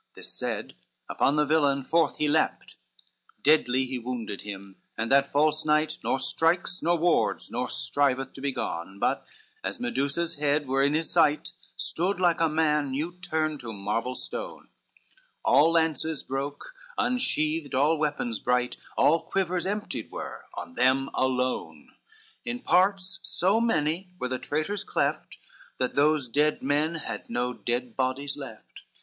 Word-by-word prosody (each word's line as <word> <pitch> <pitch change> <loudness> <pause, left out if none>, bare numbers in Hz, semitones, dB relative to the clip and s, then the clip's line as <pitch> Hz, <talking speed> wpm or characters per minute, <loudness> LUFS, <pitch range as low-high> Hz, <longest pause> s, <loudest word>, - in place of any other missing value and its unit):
This - - -5
said, - - -3 0.3
upon 140 - +2
the 150 0 +3
villain 140 -2 +2
forth 165 +2 +2
he 150 - +1
leapt; 155 +2 +1
LXVI - - -26
Deadly 130 -3 +4
he 130 0 -3
wounded 115 -4 -4
him, 100 -1 -8 0.2
and 110 +2 -2
that 140 0 +4
false 155 +2 +2
knight 155 0 +1
Nor - - +1
strikes 175 +5 +1
nor 170 +2 +2
wards 170 +1 +1
nor - - -2
striveth 135 - 0
to 135 - -10
be 140 0 0
gone; 95 -6 -4
But, - - 0 0.4
as - - -3
Medusa's 140 +7 -1
head 145 0 +1
were 135 +1 +2
in 140 +2 +3
his 160 +1 0
sight, 155 -3 +3 0.2
Stood 180 +3 -1
like 175 -3 +3
a 165 - +4
man 150 -2 +2
new 150 +6 -2
turned 155 -4 -1
to 115 -2 -6
marble 110 +5 -2
stone, - - -6 0.8
All 160 +3 +6
lances 160 -2 +1
broke, 140 - -5 0.2
unsheathed 160 - 0
all 145 +5 +4
weapons 145 -7 -1
bright, 125 0 0 0.2
All 165 +3 +5
quivers 185 -2 -1
emptied 210 +2 -3
were - - -7
on - - -7
them 135 - +2
alone, 125 - -1 0.5
In 120 0 -3
parts 190 +2 +2
so 195 +3 +2
many 180 -4 0
were 125 - -3
the 130 0 -2
traitors 155 +7 -2
cleft, - - -1 0.4
That 125 - -1
those 145 -1 +3
dead 150 +6 +1
men 150 +4 +1
had 160 - -5
no 125 +1 -1
dead 120 -1 -3
bodies 135 +2 -1
left. 135 -7 -10
145 Hz, 155 wpm, -27 LUFS, 130-165 Hz, 0.8 s, All